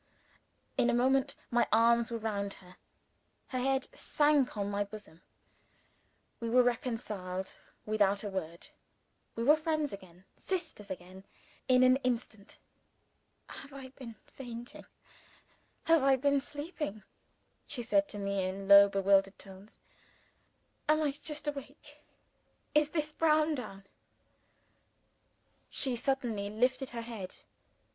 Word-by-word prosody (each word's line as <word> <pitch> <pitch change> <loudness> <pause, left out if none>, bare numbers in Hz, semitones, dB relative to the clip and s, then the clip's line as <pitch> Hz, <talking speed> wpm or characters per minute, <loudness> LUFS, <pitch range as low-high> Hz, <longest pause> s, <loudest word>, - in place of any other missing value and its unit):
In 240 - +4
a 245 - +2
moment, 265 +3 +2 0.2
my 240 0 +3
arms 230 +1 +4
were 235 - -3
round 200 -3 -3
her. 180 0 -16 0.7
Her 255 - -2
head 265 +1 0
sank 290 -6 +2
on 200 0 -2
my 205 0 0
bosom. 200 -5 -12 1.2
We 230 - -3
were 250 +2 +5
reconciled 210 -6 -3 0.3
without 205 -2 +2
a 205 - -3
word. 170 -3 -6 0.7
We 230 - -2
were 295 +5 +7
friends 310 -3 -1
again, 185 -2 -12
sisters 330 - -5
again, 185 +1 -9 0.4
in 255 0 +5
an 255 +1 +6
instant. 240 -5 -4 0.9
"Have 275 0 -10
I 265 -1 -8
been 255 -3 -10
fainting? 240 -2 -9 1.0
have 330 -2 +4
I 270 0 +5
been 280 +2 +2
sleeping?" 290 - -6 0.6
she 245 - -3
said 295 +5 +2
to 210 - -6
me 200 -1 -1
in 190 +1 -4
low, 200 0 +9
bewildered 195 0 +3
tones. 195 +1 -13 1.1
"Am 310 0 +5
I 290 - +1
just 295 +1 -7
awake? 290 +1 -7 0.7
Is 300 0 +4
this 305 -1 -2
Browndown?" 305 -11 +1 1.9
She 260 -3 -1
suddenly 235 -5 -1
lifted 255 +5 0
her 235 -1 -5
head. 220 -6 -7
240 Hz, 120 wpm, -32 LUFS, 200-275 Hz, 1.9 s, low